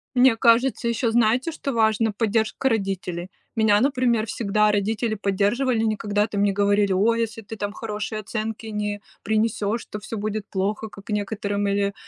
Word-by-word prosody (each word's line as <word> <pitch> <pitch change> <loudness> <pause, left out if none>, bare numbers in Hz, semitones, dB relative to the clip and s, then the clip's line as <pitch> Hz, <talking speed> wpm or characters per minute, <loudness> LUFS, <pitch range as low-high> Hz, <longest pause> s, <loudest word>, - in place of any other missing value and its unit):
Мне 250 -2 +6
кажется, 235 0 +3
еще, 230 0 0
знаете, 240 +6 +2
что 280 -4 -4
важно- 220 -1 +2
поддержка 225 +4 +1
родителей. 190 -4 -2 0.3
Меня, 215 -2 +4
например, 250 -5 +2
всегда 210 -1 +1
родители 215 +3 0
поддерживали, 215 +5 +1
никогда 210 -1 0
там 200 -2 -2
не 205 - +3
говорили: 200 0 +2
"О, 210 +5 +3
если 230 -1 -2
ты 220 +2 -8
там 205 -1 -3
хорошие 215 0 -4
оценки 220 +1 -4
не 210 -1 -3 0.2
принесешь, 220 +1 0
то 210 - -7
всё 220 +1 -6
будет 215 0 -3
плохо", 210 +3 -2
как 200 +1 -14
некоторым. 205 -1 -1
Или, 200 0 0
215 Hz, 160 wpm, -24 LUFS, 205-225 Hz, 0.3 s, Мне